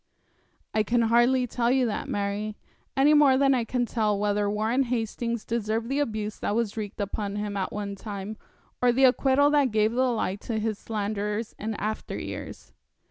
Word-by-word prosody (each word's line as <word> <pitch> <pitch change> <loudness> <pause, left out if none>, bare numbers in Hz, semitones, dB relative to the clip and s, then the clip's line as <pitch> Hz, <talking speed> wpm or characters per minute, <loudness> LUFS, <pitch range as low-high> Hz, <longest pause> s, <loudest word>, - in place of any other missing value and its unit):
'I 215 - +3
can 235 +3 +1
hardly 240 +3 +4
tell 240 0 0
you 260 0 +3
that, 220 - -3
Mary, 205 +1 -2 0.4
any 285 +3 +5
more 285 -3 +6
than 275 0 +4
I 250 -3 +1
can 245 +1 -1
tell 215 -3 0
whether 205 0 +1
Warren 220 +5 +1
Hastings 235 -1 -2
deserved 225 0 -1
the 275 +2 0
abuse 215 -6 -2
that 205 - -1
was 225 -3 -1
wreaked 215 -1 -5
upon 205 0 -3
him 205 -1 -3
at 190 -2 -2
one 205 -1 -4
time, 200 +1 -6 0.5
or 250 -1 +5
the 260 +3 +2
acquittal 270 +2 +4
that 290 -3 +3
gave 215 0 +2
the 255 +2 +2
lie 215 -5 -1
to 220 +2 -4
his 215 -1 -2
slanderers 210 0 -3
in 220 +1 -3
after 215 +2 -4
years. - - -7
220 Hz, 185 wpm, -26 LUFS, 210-245 Hz, 0.5 s, more